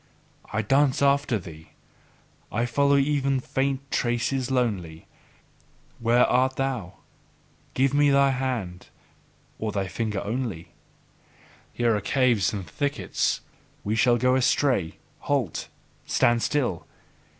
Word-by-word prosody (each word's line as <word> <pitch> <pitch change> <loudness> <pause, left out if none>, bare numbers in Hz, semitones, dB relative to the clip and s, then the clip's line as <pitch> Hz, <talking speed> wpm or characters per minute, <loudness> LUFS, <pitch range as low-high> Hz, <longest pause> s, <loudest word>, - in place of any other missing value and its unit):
I 110 +1 -1
dance 135 +4 +2
after 140 -3 +2
thee, 80 -4 -12 0.8
I 115 +3 0
follow 140 +4 +2
even 140 -1 +1
faint 135 +1 -2
traces 120 +2 0
lonely. 100 -11 -2 0.9
Where 120 +1 +4
art 130 +1 +2
thou? 125 -9 -3 0.8
Give 135 +1 +2
me 145 0 +4
thy 140 0 +4
hand! 125 -9 -3 0.7
Or 110 -1 -2
thy 100 -2 -2
finger 105 +2 -3
only! 110 -6 -4 1.0
Here 120 -2 +1
are 105 - -2
caves 120 -4 +2
and 100 -3 -5
thickets: 140 - -1 0.4
we 105 +2 -1
shall 120 +1 +4
go 125 +2 +2
astray! 130 - +1 0.2
Halt! 135 - -2 0.4
Stand 120 0 +2
still! 120 - -1
125 Hz, 115 wpm, -25 LUFS, 105-135 Hz, 1.0 s, Where